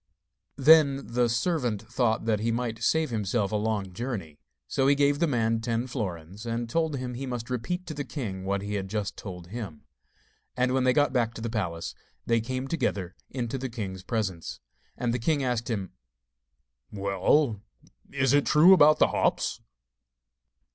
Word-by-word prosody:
Then 140 -3 +5
the 120 -1 +3
servant 120 - 0
thought 115 -1 0
that 110 -2 +1
he 115 +2 0
might 115 -1 -2
save 160 +4 +2
himself 105 -1 0
a - - -1
long 105 -3 -1
journey; 95 - -5 0.3
so 135 - +1
he 140 - +5
gave 145 0 +2
the 170 - +3
man 115 -4 +1
ten 115 +1 -1
florins, 100 - -5
and 115 0 -2
told 160 +4 0
him 125 -2 -4
he 135 +3 -5
must 120 -1 -5
repeat 175 +10 -2
to 160 - -5
the 145 -1 -3
king 105 -11 -5
what 100 +1 -1
he 105 +1 -4
had 95 -2 -2
just 105 0 -3
told 90 -4 -8
him. 100 -9 -7 0.7
And 125 0 +2
when 130 -1 +2
they 130 - +4
got 145 0 +2
back 115 -3 +1
to - - -7
the 115 0 -3
palace, 90 -7 -3 0.3
they 115 -1 +2
came 130 +3 -3
together 100 - -2
into 125 0 -3
the 130 0 -3
king's 100 -6 -5
presence. 95 -5 -3 0.4
And 120 -1 0
the 125 - -1
king 145 +4 +1
asked 125 -2 -1
him: 100 -5 -3 1.0
'Well, 100 +5 +1 0.5
is 135 -1 +2
it 145 0 +3
true 165 +5 +7
about 155 -4 +7
the - - +4
hops? - - 0
115 Hz, 175 wpm, -27 LUFS, 105-135 Hz, 1.0 s, true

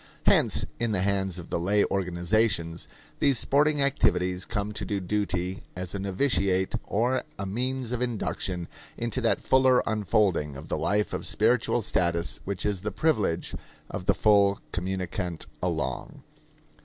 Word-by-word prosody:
Hence, - - +4
in 115 -2 0
the 95 -2 +1
hands 95 -2 0
of 85 - -9
the - - 0
lay 100 +4 +2
organizations, 90 -1 0 0.3
these 140 -3 +3
sporting 145 +4 +3
activities 90 -9 +1
come 105 -1 -3
to 105 - -2
do 100 -2 -2
duty 95 -1 -2
as 90 0 -5
a 100 - -3
novitiate 95 -2 +1
or 120 +5 +1
a 100 - -4
means 125 +4 -2
of 125 -1 -2
induction 95 -7 -2 0.3
into 120 +2 -1
that 115 - +1
fuller 130 -1 +4
unfolding 100 -9 +1
of - - -10
the - - -1
life 105 +1 0
of - - -3
spiritual - - +2
status 85 -1 +1
which 100 -2 -3
is 100 -3 0
the 105 - -2
privilege 110 - 0 0.4
of 90 - -5
the 100 0 +3
full 100 -2 +4
communicant 90 -1 -3 0.2
along. 75 -8 -3
100 Hz, 150 wpm, -27 LUFS, 90-115 Hz, 0.4 s, Hence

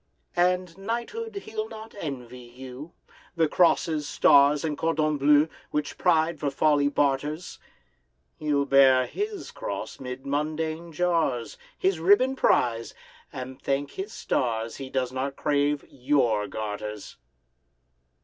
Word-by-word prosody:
And 180 0 +1
knighthood 235 - -4
he'll 435 0 -4
not 220 +1 -10
envy 125 -6 -6
you, 130 +6 -10 0.4
The 165 -2 +3
crosses, 155 -3 +2
stars, 145 +1 +5
and 155 -2 -1
cordons 155 -1 0
bleus, 145 +2 +5 0.2
Which 150 -1 -3
pride 165 -2 +2
for 145 - 0
folly 145 +1 +2
barters; 145 +3 -1 0.8
He'll 145 -2 +1
bear 135 -2 +5
his 415 - -5
cross - - -6
'mid 130 +1 -7
mundane 155 +3 -2
jars, 160 -9 0 0.2
His 185 -3 +1
ribbon 205 +10 +4
prize, 115 - +1 0.4
and 130 +1 -7
thank 140 +1 -1
his 195 +3 -6
stars 115 - -2
He 135 -1 -7
does 130 -2 -1
not 135 +1 -3
crave 145 -1 0
your 125 -6 +1
garters! 105 -1 -6
145 Hz, 120 wpm, -26 LUFS, 130-170 Hz, 0.8 s, stars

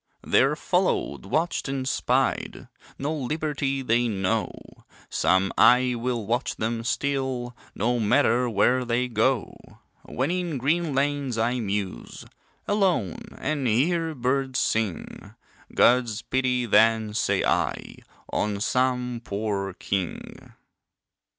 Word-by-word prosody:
They're - - +3
followed, 70 -4 -1
watched 165 0 -1
and 135 -1 -3
spied, - - 0 0.3
No 145 +3 -2
liberty 145 -1 -2
they 120 0 +2
know; 105 +1 -1 0.6
Some 95 +1 +2
eye 125 0 +5
will 120 -2 -2
watch 120 +5 -1
them 115 +1 -2
still, 130 -1 -2 0.2
No 120 +4 0
matter 120 +2 +2
where 125 +4 +2
they 120 +1 0
go. 120 +1 0 0.5
When 135 +6 -2
in 175 -4 -2
green 150 +3 0
lanes 140 -3 0
I 120 +3 0
muse, 100 - -4 0.4
Alone, 185 - -1
and 145 -4 -2
hear 160 +8 +1
birds 130 +1 -1
sing, 110 -8 -2 0.4
God's 120 -3 +3
pity 125 -1 0
then, 110 -1 +3
say - - +1
I, - - -1 0.4
On 105 -1 -1
some 125 +1 0
poor 100 -3 -3
king. 95 -4 -5
125 Hz, 110 wpm, -25 LUFS, 110-135 Hz, 0.6 s, eye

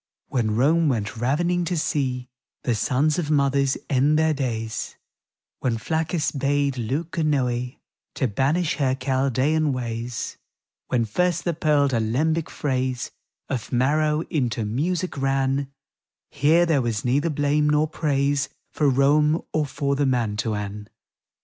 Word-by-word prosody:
[711 - - -23
When 110 -3 +1 0.2
Rome 160 - +3
went 115 -1 -2
ravening 170 +9 +1
to 175 +1 -1
see 130 -5 -1 0.4
The 125 - +1
sons 140 +8 +1
of 155 -4 -2
mothers 140 -2 +2
end 145 +3 +3
their 160 0 +3
days, 115 -5 -3 0.6
When 120 -3 0
Flaccus 160 +4 -1
bade 140 -1 0
Leuconoe 130 -1 -1 0.4
To 130 - +1
banish 145 - 0
her 130 -3 +1
Chaldean 135 +3 +1
ways, 120 -2 -4 0.5
When 120 -2 +1
first 175 +10 0
the 170 - 0
pearled, 150 -3 +2
alembic 145 +9 0
phrase 130 -3 -2 0.4
Of 130 -5 -4
Maro 150 +5 +2
into 120 -9 -1
music 165 - -2
ran 135 0 0 0.3
— - - -69 0.3
Here 155 +4 +4
there 155 -5 +2
was 115 -2 -2
neither 140 +6 +2
blame 150 0 +1
nor 150 +1 +3
praise 140 -2 0 0.2
For 150 -2 +2
Rome, 150 +4 +3
or 155 -2 +1
for 140 0 -1
the 140 0 +1
Mantuan. 105 -4 -2
140 Hz, 135 wpm, -24 LUFS, 125-150 Hz, 0.6 s, Here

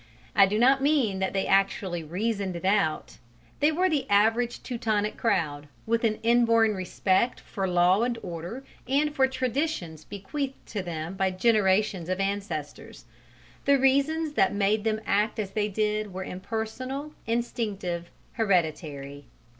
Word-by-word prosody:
I 195 - +7
do 210 +2 -1
not 265 +4 +4
mean 270 -9 +2
that 190 - 0
they 195 -1 -1
actually 195 -3 +1
reasoned 195 +3 -2
it 170 - -6
out: 195 -5 0 0.4
they 295 +2 +4
were 360 +4 +2
the 285 -6 -1
average 225 +4 +2
Teutonic 215 -4 -1
crowd, 150 -10 -1 0.2
with 230 +1 0
an 220 -2 +2
inborn 230 -2 +4
respect 190 +4 0
for 195 -2 -4
law 180 +3 +3
and 240 0 0
order 175 +9 -6 0.2
and 290 +3 +1
for 265 -2 +3
traditions 255 - -2
bequeathed 260 - -5
to 205 - -3
them 165 -1 -5
by 190 0 +1
generations 190 -2 +2
of 185 +1 -1
ancestors: 195 - -4 0.6
the 280 0 +5
reasons 280 +4 +2
that 195 -7 +2
made 205 +2 +1
them 220 0 0
act 210 +2 +1
as 205 -3 -3
they 210 0 0
did 210 0 -1
were 190 +1 -5
impersonal, 230 +10 -5
instinctive, 210 -7 -2 0.2
hereditary. 155 - -1
210 Hz, 145 wpm, -27 LUFS, 185-240 Hz, 0.6 s, I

